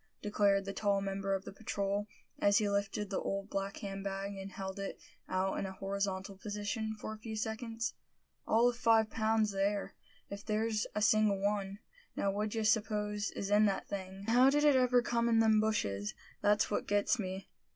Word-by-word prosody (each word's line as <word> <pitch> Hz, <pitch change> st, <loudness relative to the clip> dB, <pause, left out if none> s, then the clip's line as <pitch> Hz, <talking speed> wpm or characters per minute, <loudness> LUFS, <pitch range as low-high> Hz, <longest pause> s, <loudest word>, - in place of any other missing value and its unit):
declared 200 Hz, -1 st, +2 dB
the 195 Hz, -, -4 dB
tall 200 Hz, -1 st, +1 dB
member 195 Hz, 0 st, -1 dB
of 190 Hz, -, -5 dB
the -, -, -7 dB
patrol, 200 Hz, -1 st, -2 dB, 0.3 s
as 200 Hz, 0 st, +4 dB
he 215 Hz, -, +2 dB
lifted 200 Hz, 0 st, -1 dB
the 195 Hz, -, 0 dB
old 195 Hz, +1 st, -3 dB
black 195 Hz, 0 st, -2 dB
hand 195 Hz, -1 st, -5 dB
bag, 195 Hz, 0 st, -3 dB
and 195 Hz, 0 st, -7 dB
held 190 Hz, 0 st, -5 dB
it 195 Hz, -, -5 dB, 0.3 s
out 185 Hz, +1 st, 0 dB
in 195 Hz, -, -2 dB
a 190 Hz, -, -6 dB
horizontal 195 Hz, 0 st, -3 dB
position 210 Hz, +2 st, -3 dB
for 215 Hz, -, -5 dB
a 215 Hz, -, -10 dB
few 220 Hz, 0 st, -6 dB
seconds. 225 Hz, +1 st, -3 dB, 0.5 s
"All 230 Hz, +2 st, +4 dB
of 245 Hz, -, +1 dB
five 225 Hz, -3 st, +4 dB
pounds 220 Hz, -1 st, +2 dB
there, 200 Hz, +1 st, -1 dB, 0.3 s
if 200 Hz, 0 st, -7 dB
there's 215 Hz, 0 st, 0 dB
a 210 Hz, -, +1 dB
single 215 Hz, -2 st, +4 dB
one. 200 Hz, -1 st, -1 dB, 0.4 s
Now, 200 Hz, -, +1 dB
what 210 Hz, +2 st, -1 dB
d'ye 220 Hz, +1 st, -2 dB
suppose 210 Hz, -1 st, +1 dB
is 200 Hz, 0 st, -3 dB
in 210 Hz, +1 st, +6 dB
that 195 Hz, -, -2 dB
thing?" 190 Hz, -1 st, -6 dB
"And -, -, -3 dB
how 250 Hz, +3 st, +6 dB
did 295 Hz, +2 st, +2 dB
it 295 Hz, -2 st, +6 dB
ever 250 Hz, -1 st, +4 dB
come 235 Hz, -1 st, +1 dB
in 230 Hz, -, +4 dB
them 220 Hz, -1 st, +5 dB
bushes; 105 Hz, -, -1 dB, 0.3 s
that's 210 Hz, +1 st, +3 dB
what -, -, -1 dB
gets 205 Hz, +4 st, +2 dB
me?" 190 Hz, -1 st, -4 dB
205 Hz, 195 wpm, -33 LUFS, 195-220 Hz, 0.5 s, in